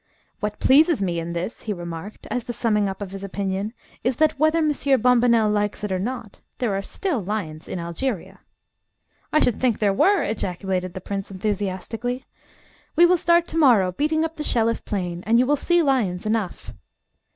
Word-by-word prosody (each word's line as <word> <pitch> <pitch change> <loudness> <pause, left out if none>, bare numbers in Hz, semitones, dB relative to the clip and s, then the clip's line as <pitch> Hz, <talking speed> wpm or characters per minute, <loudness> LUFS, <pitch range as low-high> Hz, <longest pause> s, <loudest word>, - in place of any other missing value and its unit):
"What 210 0 -3
pleases 305 +1 +5
me 175 -3 -1
in 170 +1 -4
this," 170 +6 -4
he 215 - -3
remarked, 175 +2 -8
as 250 -2 -2
the 240 - -4
summing 210 -4 +1
up 195 +1 -5
of 190 - -8
his 195 0 -7
opinion, 195 +1 -3 0.3
"is 250 +1 +1
that, 310 0 +2
whether 310 +2 +3
Monsieur 290 -3 +2
Bombonnel 235 -2 +4
likes 210 0 -1
it 210 - -2
or 185 - 0
not, 225 0 -5 0.2
there 235 -5 0
are 195 - -1
still 285 - -2
lions 175 -6 -4
in - - -4
Algeria." 170 +5 -4 0.9
"I 305 - +4
should 245 -7 +1
think 245 -4 +2
there 205 -2 +2
were!" 390 - +3
ejaculated 185 -3 -2
the 185 - -5
prince 195 +1 -4
enthusiastically. 205 +5 -3 0.7
"We 340 +2 +7
will 360 +1 +5
start 340 +1 +3
to 325 - -4
morrow 225 - +5
beating 310 - +1
up 325 0 -6
the 300 - -3
Shelliff 230 -4 +1
Plain, 180 -3 -3
and 230 +1 +4
you 250 - +4
will 290 +3 +3
see 345 +4 +2
lions 220 - 0
enough!" 215 -4 -2
215 Hz, 185 wpm, -23 LUFS, 190-265 Hz, 0.9 s, We